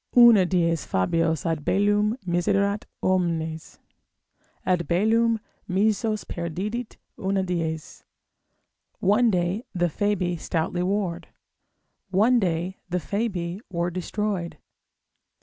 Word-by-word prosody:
Una 230 Hz, -6 st, +8 dB
dies 170 Hz, -4 st, +1 dB
Fabios 160 Hz, -, 0 dB
ad 165 Hz, -3 st, -1 dB
bellum 205 Hz, -, +2 dB
miserat 200 Hz, +4 st, +1 dB, 0.2 s
omnes, 165 Hz, -4 st, -1 dB, 0.9 s
Ad 180 Hz, -2 st, +1 dB
bellum 225 Hz, +5 st, +3 dB, 0.3 s
missos 215 Hz, +3 st, +1 dB
perdidit 195 Hz, +8 st, -4 dB, 0.2 s
una 195 Hz, 0 st, 0 dB
dies. 165 Hz, -4 st, -3 dB, 1.0 s
One 220 Hz, +5 st, +4 dB
day 180 Hz, +3 st, 0 dB
the 175 Hz, -1 st, +2 dB
Fabii 180 Hz, -1 st, 0 dB
stoutly 165 Hz, +2 st, -2 dB
warred, 185 Hz, -2 st, -1 dB, 0.8 s
One 220 Hz, +6 st, +4 dB
day 180 Hz, -1 st, -1 dB
the 180 Hz, -, 0 dB
Fabii 180 Hz, +2 st, -3 dB
were 175 Hz, -1 st, -1 dB
destroyed. 185 Hz, 0 st, -3 dB
185 Hz, 95 wpm, -25 LUFS, 170-205 Hz, 1.0 s, Una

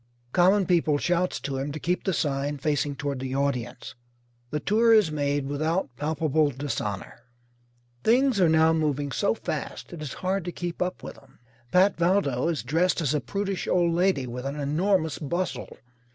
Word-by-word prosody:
Common 190 Hz, +5 st, +4 dB
People 165 Hz, -4 st, +2 dB
shouts 175 Hz, +4 st, 0 dB
to 135 Hz, -1 st, -3 dB
him 140 Hz, +2 st, -3 dB
to 155 Hz, -, -5 dB
keep 175 Hz, +4 st, -1 dB
the 190 Hz, -, +2 dB
sign 145 Hz, -3 st, -1 dB
facing 145 Hz, 0 st, -1 dB
toward 140 Hz, -1 st, -3 dB
the 130 Hz, 0 st, -4 dB
audience. 125 Hz, -3 st, -2 dB, 0.6 s
The 150 Hz, -, -2 dB
tour 225 Hz, +6 st, +4 dB
is 205 Hz, -8 st, +4 dB
made 145 Hz, -1 st, -1 dB
without 150 Hz, 0 st, -1 dB
palpable 155 Hz, +1 st, +1 dB
dishonour. 125 Hz, -8 st, -4 dB, 0.8 s
Things 250 Hz, -2 st, +3 dB
are 175 Hz, -, +5 dB
now 160 Hz, 0 st, +4 dB
moving 145 Hz, -3 st, 0 dB
so -, -, +1 dB
fast -, -, -5 dB
it 165 Hz, -, -8 dB
is 150 Hz, -4 st, -5 dB
hard 190 Hz, 0 st, 0 dB
to 175 Hz, -, -3 dB
keep 175 Hz, 0 st, -5 dB
up 180 Hz, 0 st, -2 dB
with -, -, -8 dB
them. -, -, -21 dB, 0.3 s
Pat 190 Hz, +2 st, +4 dB
Valdo 170 Hz, -7 st, +1 dB
is 170 Hz, -3 st, -1 dB
dressed 165 Hz, +10 st, +1 dB
as 150 Hz, -4 st, 0 dB
a 150 Hz, -, 0 dB
prudish 200 Hz, -1 st, -3 dB
old 175 Hz, -2 st, +2 dB
lady 175 Hz, -6 st, +2 dB
with 125 Hz, +2 st, -5 dB
an 140 Hz, +2 st, -4 dB
enormous 160 Hz, +3 st, +1 dB
bustle. 165 Hz, -3 st, -3 dB
155 Hz, 175 wpm, -26 LUFS, 140-180 Hz, 0.8 s, are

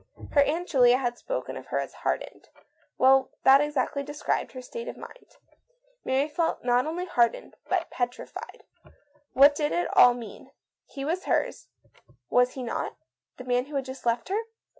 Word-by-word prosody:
Her 285 Hz, -, +5 dB
Aunt 325 Hz, +5 st, 0 dB
Julia 250 Hz, -3 st, +5 dB
had 245 Hz, -2 st, -3 dB
spoken -, -, -4 dB
of -, -, -9 dB
her -, -, -2 dB
as -, -, -3 dB
"hardened." -, -, -4 dB, 0.5 s
Well, 265 Hz, 0 st, +5 dB
that 270 Hz, +1 st, +7 dB
exactly 290 Hz, -1 st, -1 dB
described 290 Hz, +1 st, -3 dB
her 255 Hz, -, -7 dB
state 470 Hz, -, -7 dB
of -, -, -6 dB
mind. -, -, -13 dB, 0.7 s
Mary 270 Hz, +3 st, +1 dB
felt 325 Hz, +2 st, -1 dB
not 245 Hz, +2 st, +2 dB
only 345 Hz, +3 st, -3 dB
hardened, 240 Hz, -10 st, 0 dB, 0.2 s
but -, -, -1 dB
petrified. 245 Hz, 0 st, -5 dB, 0.7 s
What 280 Hz, +2 st, +7 dB
did 295 Hz, 0 st, -1 dB
it 175 Hz, +1 st, 0 dB, 0.3 s
mean? 235 Hz, -2 st, -10 dB, 0.3 s
He 275 Hz, -2 st, -7 dB
was 345 Hz, +5 st, -2 dB
here, -, -, +1 dB, 0.8 s
was 250 Hz, 0 st, +3 dB
he 260 Hz, -, -6 dB
not; 235 Hz, -, -3 dB, 0.4 s
the 255 Hz, -, -8 dB
man 250 Hz, 0 st, 0 dB
who 290 Hz, +1 st, -9 dB
had 270 Hz, -1 st, -1 dB
just 260 Hz, -2 st, -7 dB
left 235 Hz, +7 st, 0 dB
her? 410 Hz, +3 st, 0 dB
270 Hz, 165 wpm, -27 LUFS, 245-300 Hz, 0.8 s, that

